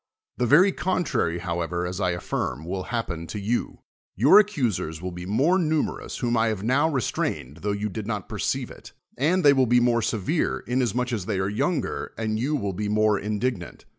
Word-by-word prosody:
The 125 - +1
very 180 - +6
cojitrary 175 - -1
however, 85 0 -2
as 90 +3 -4
I 90 - +2
affirm, 85 -3 -3
will 95 +1 -4
happen 85 -9 -3
to 105 - -5
you. 110 +5 -2 0.3
Your 140 - +7
accusers 120 - 0
will 90 +2 -5
be 90 +1 -7
more 140 - +3
numerous, 155 -3 -1
whom 120 -2 0
I 115 0 +3
have 110 -3 -2
riow 140 +7 +2
restrained, 85 - -2
tho 105 +5 -2
you 100 +1 -2
did 105 0 -6
not 105 -5 -3
perceive - - -2
it; - - -13 0.2
and 170 +6 +1
they 140 - +8
will 130 -2 +3
be 120 +1 +5
more 120 -1 +2
severe, 110 - -1
inas 125 -2 0
much 125 0 -1
as 100 -5 -3
they 105 -3 -1
are 95 +1 0
younger 145 +11 -2
and 110 -1 -1
you 140 +6 0
will 100 -8 -2
be 105 +3 -3
more 105 -1 +2
indignant. 105 -2 -3
110 Hz, 195 wpm, -25 LUFS, 95-130 Hz, 0.3 s, they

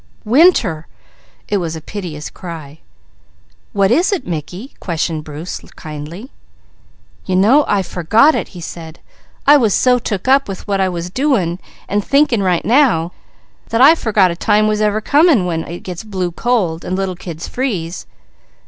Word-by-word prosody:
"Winter!" 225 - +3 0.6
It 205 - 0
was 165 -3 -3
a - - -5
piteous 160 -3 -7
cry. 160 -4 -9 0.9
"What 200 -2 +2
is 335 - +3
it, 365 -10 -2
Mickey?" 175 - -6
questioned 165 -2 -3
Bruce 155 +4 -7 0.2
kindly. 155 - -8 1.0
"You 185 - 0
know 230 +11 +4
I 200 -2 +1
forgot 215 - +3
it," - - -2
he 180 - -11
said. 165 -1 -9 0.5
"I 290 +1 +7
was 225 -7 +2
so 250 -1 +3
took 210 -2 -4
up 275 +1 +4
with 195 0 -7
what 195 -1 0
I 190 - +2
was 175 0 -5
doing, 200 - 0 0.3
and 205 0 0
thinking 275 -4 +2
right 180 -3 0
now, 230 - +3 0.6
that 230 - 0
I 275 +5 +8
forgot 210 - +2
a - - -4
time 210 +3 +2
ever 210 -1 +1
was 215 - -2
coming 290 - +4
when 165 -2 -3
it 170 +2 -7
gets 180 0 -7
blue 190 -4 -3
cold, 180 -6 -1
and 185 - -3
little 190 -1 -2
kids 170 -2 -7
freeze. 190 -10 -3
195 Hz, 165 wpm, -17 LUFS, 170-240 Hz, 1.0 s, I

